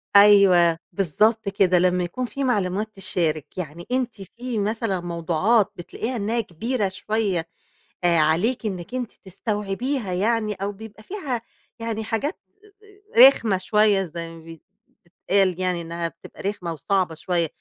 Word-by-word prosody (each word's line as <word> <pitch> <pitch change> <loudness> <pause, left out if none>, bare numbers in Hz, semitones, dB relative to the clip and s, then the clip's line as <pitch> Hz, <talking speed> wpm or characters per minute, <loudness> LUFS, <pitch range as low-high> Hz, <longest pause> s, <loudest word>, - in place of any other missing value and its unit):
أيوه، 195 -5 +7 0.2
بالضبط 210 +4 +2
كده. 185 -2 +3
لمَّا 180 0 +2
يكون 215 +9 -3
في 275 +3 -4
معلومات 205 -4 0
تتشارك، 170 -6 -2
يعني 170 -1 -6
أنتِ 250 -5 -1 0.2
في 245 -2 -3
مثلًا 205 -2 -1
موضوعات 175 +5 +1
بتلاقيها 225 +8 -5
إن 210 -2 -2
هي 230 0 +1
كبيرة 210 +4 -2
شوية، 190 -3 -1 0.6
آآ، 170 -2 +4
عليكي 185 +10 +2
إنِك 185 +4 -6
أنتِ 250 -3 -3
تستوعبيها 205 +3 -3
يعني؟ 215 +3 +1
أو 200 +1 -3
بيبقى 215 +1 -12
فيها 275 - -4 0.4
يعني، 225 -1 -3
حاجات 255 - -2 0.8
آآ، 250 +3 +12
رخمة 220 -8 0
شوية، 210 0 +3
زي 170 -1 -6
ما 165 - -11 0.7
بيتقال 185 0 +1
يعني 180 -2 0
إنها 170 0 -3
بتبقى 165 - -13
رخمة 190 -4 -3
وصعبة 175 +2 0
شوية. 170 0 0
200 Hz, 140 wpm, -23 LUFS, 175-225 Hz, 0.8 s, آآ